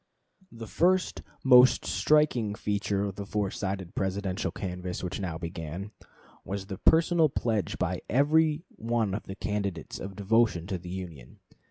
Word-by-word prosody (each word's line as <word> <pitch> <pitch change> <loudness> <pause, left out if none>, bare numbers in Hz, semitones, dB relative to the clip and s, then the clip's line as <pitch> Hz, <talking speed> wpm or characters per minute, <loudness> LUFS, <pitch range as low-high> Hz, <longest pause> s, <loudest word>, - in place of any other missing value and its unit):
The 115 -1 -8
first, 180 - +1 0.2
most 125 -1 +6
striking 125 -9 +2
feature 100 -1 -1
of 100 -2 -4
the 100 - -5
four 100 -2 -1
sided 95 -2 -4
Presidential 95 +1 -2
canvass 90 -1 -5
which 90 +2 -3
now 90 -5 -3
began, 85 +3 -6 0.5
was 95 0 -4
the 95 0 -7
personal 165 +2 +4
pledge 110 -6 -1
by - - -1
every 155 +4 +3
one 115 -3 0
of 105 - -4
the 95 - -6
candidates 100 -5 -3
of 95 0 -7
devotion 105 -3 +2
to 95 -1 -3
the 90 +1 -9
Union. 85 -9 -8
100 Hz, 150 wpm, -28 LUFS, 95-115 Hz, 0.5 s, most